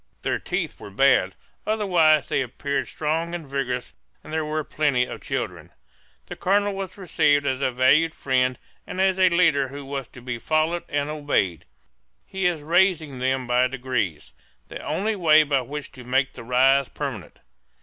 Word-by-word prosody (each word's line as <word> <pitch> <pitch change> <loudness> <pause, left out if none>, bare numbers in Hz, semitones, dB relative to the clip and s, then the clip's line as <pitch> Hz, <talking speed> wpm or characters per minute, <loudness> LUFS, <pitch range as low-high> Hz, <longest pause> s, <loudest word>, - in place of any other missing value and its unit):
Their - - 0
teeth - - -3
were - - -9
bad; 120 -3 +3 0.3
otherwise 175 -9 +3
they - - 0
appeared 135 +2 -3
strong 165 +3 -2
and 165 -4 -7
vigorous, 125 -3 -3 0.3
and 155 - -10
there 160 0 0
were 155 0 -2
plenty 145 -4 +1
of - - -8
children. - - -4 0.6
The - - -8
colonel 200 +2 +1
was 195 -1 -6
received 150 -6 +2
as 130 -1 -1
a 135 - +2
valued 135 +6 +3
friend 130 -2 +1 0.3
and 185 - -6
as 190 0 +2
a 185 -1 +6
leader 165 -6 +3
who 140 +1 -9
was 135 -2 -5
to - - -14
be 120 -2 -4
followed 155 +5 0
and 145 0 -1
obeyed. 145 - -1 0.6
He 190 -1 -1
is 170 -4 -1
raising 165 -4 +2
them 130 0 0
by 125 +1 +3
degrees 125 - -3 0.4
the - - -7
only 215 +3 -1
way 155 -4 +5
by 140 -3 +1
which 140 +3 -7
to 125 - -12
make 130 +2 0
the 120 - -9
rise 130 +3 +3
permanent. 130 - -6
145 Hz, 170 wpm, -24 LUFS, 130-165 Hz, 0.6 s, a